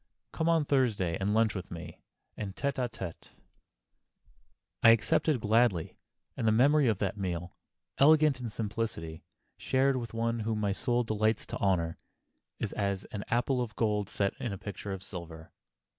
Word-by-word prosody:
Come 160 +1 0
on 165 -3 +3
Thursday, 115 -12 +1
and 100 +1 0
lunch 110 0 +3
with 95 -2 -6
me, 85 - -9 0.3
en 100 -2 -5
tête 140 +6 -1
à 120 - -1
tête." 95 -7 -8 1.5
I 115 - +8
accepted 120 +5 +3
gladly, 105 -5 +2 0.4
and 115 - -1
the - - +5
memory 140 +5 +4
of 110 -4 +2
that 100 +1 -2
meal, 90 -2 -3 0.4
elegant 150 -1 +5
in 120 -2 -4
simplicity, 105 -8 -4 0.4
shared 135 0 +2
with 115 -2 -5
one 115 0 0
whom 110 0 -1
my 105 -2 +1
soul 120 +4 0
delights 110 0 0
to - - -5
honor, 85 -4 +1 0.6
is - - -3
as 100 -1 -1
an 105 -1 -4
apple 125 +2 +1
of 115 -2 -4
gold 105 -3 0
set 100 -1 0
in 120 - -3
a 100 - -4
picture 100 +1 -6
of 95 -1 -5
silver. 85 -4 -8
110 Hz, 165 wpm, -30 LUFS, 95-120 Hz, 1.5 s, I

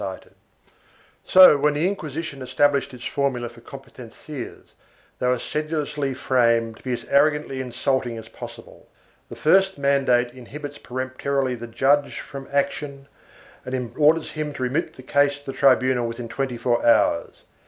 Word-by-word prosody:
IV] - - -2
COMPETENCIAS 95 - -9 0.9
519 - - -14
So, 185 -6 +8
when 150 0 +4
the 155 +5 +1
Inquisition 160 -6 -5
established 140 +2 +1
its 125 -1 -10
formula 130 -4 -1
for 120 0 -16
compe 135 +3 -11
tencias, 125 +2 -9 0.5
they 125 - 0
were 125 0 +2
sedulously 150 -1 -3
framed 115 -4 +1
to - - -19
be 130 - -3
as 120 - -5
arrogantly 150 -2 +2
insulting 125 -1 -1
as 110 -1 -9
possible. 115 - -11 0.4
The - - -8
first 190 +4 +3
mandate 135 -3 +2
inhibits 145 +4 -9
peremptorily 130 +1 -2
the 120 -1 -7
judge 140 +5 +1
from 135 -1 -9
action 140 0 -2 0.6
and 125 -2 -4
orders 155 +1 +3
him 155 -1 -4
to 130 - -5
remit 140 +7 -1
the 130 - -12
case 145 +2 +2
to 145 - -19
the - - -11
tribunal 130 -3 +3
within 115 +1 -6
twenty 130 0 -3
four 120 0 0
hours. 110 -7 +2
135 Hz, 160 wpm, -23 LUFS, 125-145 Hz, 0.9 s, So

